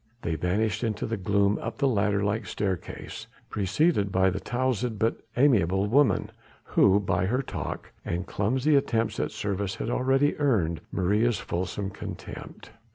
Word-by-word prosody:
They 85 - -1
vanished 100 +9 0
into 110 -3 -1
the 115 - -2
gloom 100 +1 +1
up 115 - -5
the 140 - +2
ladder 105 -4 +1
like 100 +1 -1
staircase, 95 -4 -4 0.2
preceded 100 - +1
by 95 0 +3
the 100 - -3
towzled 125 -1 -1
but 110 +3 0 0.2
amiable 100 -8 +4
woman, 135 +7 +3 0.3
who 100 +1 +4
by 90 -2 0
her 125 +6 0
talk - - -5
and 85 +2 -3
clumsy 130 +11 +1
attempts 115 -6 +1
at - - 0
service 100 -1 -2
had 115 - -3
already 135 +3 +2
earned 90 - +1
Maria's 105 +5 +2
fulsome 95 +3 -3
contempt. - - -8
105 Hz, 150 wpm, -27 LUFS, 95-120 Hz, 0.3 s, amiable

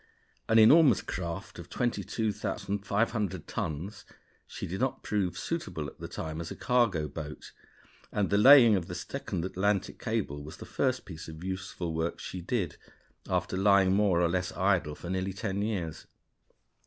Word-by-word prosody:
An 110 - +5
enormous 130 - +7
craft 85 -2 -5
of - - -9
22,500 105 -4 -1
tons, 85 +7 -4 0.4
she - - -6
did 95 +6 -4
not 130 0 -1
prove 100 -4 -1
suitable 165 - -3
at - - -9
that - - -7
time 80 0 -4
as 85 - -6
a - - -6
cargo 115 -11 +2
boat; 75 +1 -8 0.6
and 105 -2 0
the 100 - +4
laying 125 -2 +9
of 90 -3 -2
the - - -5
second 85 - -4
Atlantic 95 +1 -1
cable 105 -11 -2
was 75 - -9
the - - -9
first 130 -1 -1
piece 80 -3 -9
of 80 +1 -9
useful 95 -2 -4
work 80 +1 -1
she 90 - -6
did, 90 -3 -2 0.5
after - - 0
lying 95 -1 +4
more 95 -4 +3
or - - +4
less 90 +1 -1
idle 90 -6 +1
for 85 - -9
nearly 95 +1 -1
ten 100 0 -3
years. 95 -7 -3
95 Hz, 160 wpm, -29 LUFS, 85-105 Hz, 0.6 s, laying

